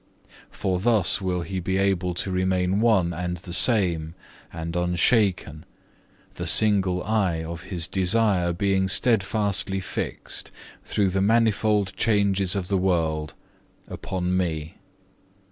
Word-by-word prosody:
For 95 -3 -2
thus 110 -2 +2
will 90 -2 -1
he 95 +3 -4
be 95 +2 -2
able 95 -2 0
to 95 - -2
remain 95 +1 0
one 100 -7 +2
and 90 +1 -4
the 85 0 -8
same 85 -7 +2 0.4
and 80 +1 -6
unshaken, 90 -2 +1 0.7
the - - -5
single 95 -4 +3
eye 95 -6 0
of 85 +1 -7
his 85 -4 -2
desire 95 -2 +1
being 95 +1 0
steadfastly 100 -2 +1
fixed, 95 - -5 0.3
through 100 -2 0
the 95 +1 -1
manifold 105 -2 +2
changes 100 -3 +1
of 95 -2 -3
the 95 -1 0
world, 80 -5 -1 0.5
upon 90 -1 -3
Me. 80 -4 -2
95 Hz, 125 wpm, -24 LUFS, 90-100 Hz, 0.7 s, single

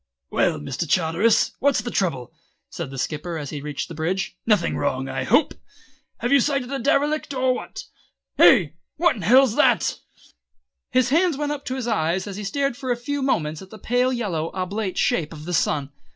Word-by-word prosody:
"Well, - - +1
Mr. 135 - -4
Charteris, 180 +6 +2
what's 280 -1 +2
the 240 - -5
trouble?" 150 - -2 0.4
said 170 -5 -5
the 135 - -8
Skipper 155 +5 -3
as 145 -3 -6
he 145 - -5
reached 145 -1 -4
the - - -9
bridge. 175 +5 -2
"Nothing 210 -6 +2
wrong, 130 -2 -1
I 135 -1 -3
hope? 255 - +3 0.7
Have 240 - -1
you 280 - +6
sighted 270 -1 0
a 275 - -2
derelict, 290 +2 0
or 255 0 +2
what? - - -7 0.6
Ay, 175 - +6 0.2
what 350 -2 +2
in 210 - -7
hell's 245 +5 +5
that!" - - +3 0.9
His 255 -1 +2
hands 330 +1 +2
went 295 0 -2
up 290 -1 -5
to 260 - -3
his 260 -3 -4
eyes 185 -5 0
and 200 -2 -6
he 210 - -6
stared 275 +5 -1
for 255 0 -4
a 240 - 0
few 285 +4 -3
moments 155 - -1
at 190 - -12
the 220 - -11
pale 245 +4 +1
yellow 185 -10 -2
oblate 190 +1 -3
shape 155 -3 +1
of 155 -2 -10
the 180 - -4
sun. 145 -3 0
205 Hz, 195 wpm, -23 LUFS, 160-260 Hz, 0.9 s, you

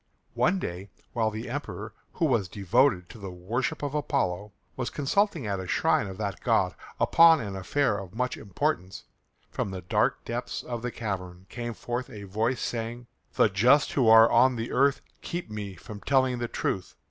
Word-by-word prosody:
One 185 +2 +2
day 95 - -5 0.2
while 110 -2 +1
the 110 +2 -6
Emperor, 145 +5 -5 0.2
who - - 0
was 95 - +2
devoted 100 0 +2
to 115 - -11
the 100 -1 -6
worship 115 - -3
of 145 -1 -2
Apollo, 105 -9 -1 0.2
was 125 -2 -2
consulting 160 - 0
at 100 -2 -2
a 95 - -6
shrine 90 - +2
of 95 -1 -7
that 100 -2 -4
god - - +2 0.3
upon 165 -1 +6
an 100 -3 -5
affair 105 +3 0
of 95 0 -10
much 125 +1 -1
importance, 95 -2 -2 0.5
from - - -2
the 95 -1 -6
dark 90 - +1
depths 120 0 -4
of 120 -2 -5
the 125 - -2
cavern 95 -6 -5
came 120 -1 -5
forth 120 +2 -4
a 105 -5 -9
voice 110 +6 -1
saying, 120 +1 -4 0.3
"The - - +5
just 120 +9 +4
who 130 -5 +2
are 115 0 +9
on 130 +2 +5
the 115 0 -4
earth 140 +2 +3 0.2
keep 175 -9 -5
me 100 -3 -5
from 105 +4 -10
telling 130 0 +2
the 120 - -2
truth. 95 -4 -3
115 Hz, 180 wpm, -27 LUFS, 100-130 Hz, 0.5 s, are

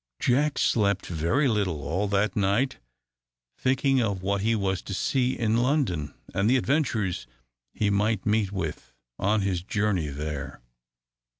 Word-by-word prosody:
Jack 140 +4 +2
slept 100 -4 +2
very 85 - +1
little 95 - 0
all 90 +7 -1
that 100 0 +1
night, 105 +7 +1 0.8
thinking 135 0 +2
of 100 -4 -1
what 100 +1 0
he 115 +2 +2
was 95 -3 -1
to 100 - -5
see 130 +4 0
in 115 -1 +1
London, 120 - 0 0.2
and 100 +3 +2
the 130 - +5
adventures 110 - 0 0.4
he 105 -1 0
might 105 0 +1
meet 105 -2 +1
with 80 -9 -5 0.2
on 105 +2 +2
his 95 -3 -1
journey 100 -3 0
there. 70 -1 -5
100 Hz, 140 wpm, -26 LUFS, 90-120 Hz, 0.8 s, the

